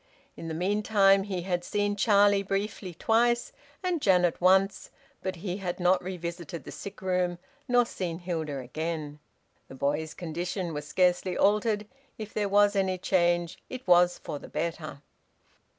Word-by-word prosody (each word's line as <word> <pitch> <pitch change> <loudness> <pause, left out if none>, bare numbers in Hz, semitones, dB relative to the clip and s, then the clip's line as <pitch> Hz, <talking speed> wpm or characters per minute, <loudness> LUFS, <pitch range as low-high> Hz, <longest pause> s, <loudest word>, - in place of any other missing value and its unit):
In 165 - -8
the 160 - -4
meantime 195 +2 +3
he 185 -4 -3
had 175 -1 -1
seen 205 +2 -1
Charlie 205 -1 +4
briefly 195 -2 -3
twice, 235 +4 +2 0.3
and 355 -4 0
Janet 180 -5 +3
once, 190 +2 +3 0.3
but 185 -1 -3
he 180 +1 -4
had 185 -3 -4
not 180 +1 +3
revisited 170 -2 -6
the - - -9
sick 200 - -9
room 180 -1 0 0.3
nor 245 -1 +4
seen 175 -7 -4
Hilda 165 -5 -3
again. 150 +3 -4 0.5
The 135 - -11
boy's 150 +4 -1
condition 175 +1 -4
was 150 0 -5
scarcely 180 +3 +1
altered; 210 +1 +2 0.3
if 215 -1 -7
there 205 -2 -1
was 205 +1 +4
any 190 -1 +1
change, 175 -2 +1
it 255 -4 -8
was 175 0 +5
for 145 - -6
the - - -11
better. 155 -2 -4
180 Hz, 150 wpm, -28 LUFS, 170-200 Hz, 0.5 s, was